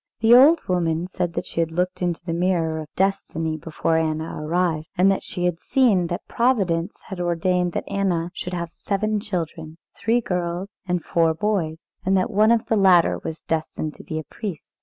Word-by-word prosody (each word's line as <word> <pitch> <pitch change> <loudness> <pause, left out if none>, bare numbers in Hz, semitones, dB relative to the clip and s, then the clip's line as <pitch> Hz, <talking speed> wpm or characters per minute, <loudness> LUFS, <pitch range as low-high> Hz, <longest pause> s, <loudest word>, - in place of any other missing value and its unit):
The 225 +1 +5
old 290 +7 +7
woman 170 -2 0
said 180 -1 -3
that - - -3
she - - -5
had 165 -1 +1
looked 180 +3 -2
into 175 -1 -2
the 165 - -2
mirror 170 -2 0
of 155 - -6
destiny, 170 -5 0
before 160 +1 -1
Anna 160 0 -1
arrived, 160 -1 0
and 195 +2 +5
she 175 -1 -3
had 175 -2 0
seen 210 -9 +2
that 175 0 -5
Providence 195 -8 +1
had 190 -3 -6
ordained 175 +1 0
that - - -2
Anna 180 -4 -1
should 180 - -5
have 170 -1 -4
seven 210 +3 -1
children, 165 -5 -5 0.2
three 230 +2 +1
girls 180 -2 -2 0.2
and 180 -1 -1
four 165 -1 +2
boys, 170 -5 -1 0.2
and 190 0 +2
that 205 +6 0
one 215 +2 +4
of 235 -1 +2
the 225 - +1
latter 185 -4 +5
was 160 - -6
destined 155 -1 -2
to - - -13
be 155 - -5
a 155 - -3
priest. 190 -2 -7
175 Hz, 190 wpm, -23 LUFS, 165-195 Hz, 0.2 s, old